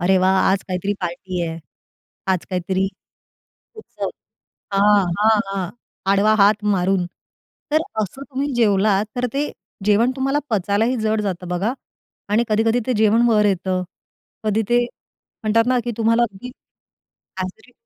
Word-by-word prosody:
अरे 185 +2 +3
वाह! 190 +1 +3
आज 195 0 +1
काहीतरी 185 +2 -1
पार्टी 180 0 -3
आहे, 165 0 -5 0.7
आज 180 - -2
काहीतरी. 190 +1 0 0.9
उत्सव 435 - -6 0.7
हां, 205 0 +5 0.2
हां, 220 0 +4
हां, 195 -3 -3 0.4
आडवा 205 +2 +4
हात 205 +1 +4
मारून. 185 0 +1 0.7
तर 310 +1 +4 0.2
असं 215 +7 -5
तुम्ही 280 +1 -3
जेवलात 205 -3 +3
तर 250 0 0
ते 290 +2 -1 0.3
जेवण 220 +4 +4
तुम्हाला 270 +2 +1
पचायलाही 215 +4 +1
जड 215 0 +1
जातं 185 -3 -3
बघा 190 +7 -1 0.6
आणि 215 +3 +3
कधी-कधी 225 +2 +2
ते 255 - +2
जेवण 220 +2 +4
वर 210 -2 +4
येतं, 185 -1 0 0.6
कधी 215 +1 +1
ते 240 0 +3 0.6
म्हणतात 225 +1 +3
ना, 255 0 +3
की 240 - -2
तुम्हाला 230 +1 +3
अगदी 220 +2 -5 0.9
ॲसिडिटी 220 +7 -7
210 Hz, 140 wpm, -21 LUFS, 190-230 Hz, 0.9 s, हां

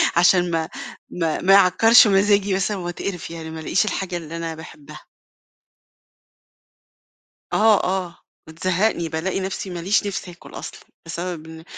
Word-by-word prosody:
عشان 175 0 +4
ما 160 -1 -1 0.4
ما 165 -3 -2
ما 195 +2 +4
يعكّرش 220 +5 +6
مزاجي 200 0 +3
مثلًا 195 +1 -1
وأتقِرِف 175 0 -5
يعني 165 -1 -8
ما 160 0 -7
لقيش 180 +5 +1
الحاجة 190 -4 -3
اللي 165 0 -7
أنا 165 -1 -4
باحبها. 155 -2 -12 2.5
آه، 215 -1 +4
آه، 180 -2 -2 0.3
بتزهّقني 175 +1 -1
بالاقي 160 +5 -2
نفْسي 190 0 -4
ماليش 180 +4 0
نِفْس 190 -2 -5
آكُل 175 0 -14
أصلًا، - - -8 0.3
بسبب 170 -1 -5
إن 160 0 -11
180 Hz, 135 wpm, -21 LUFS, 165-195 Hz, 2.5 s, يعكّرش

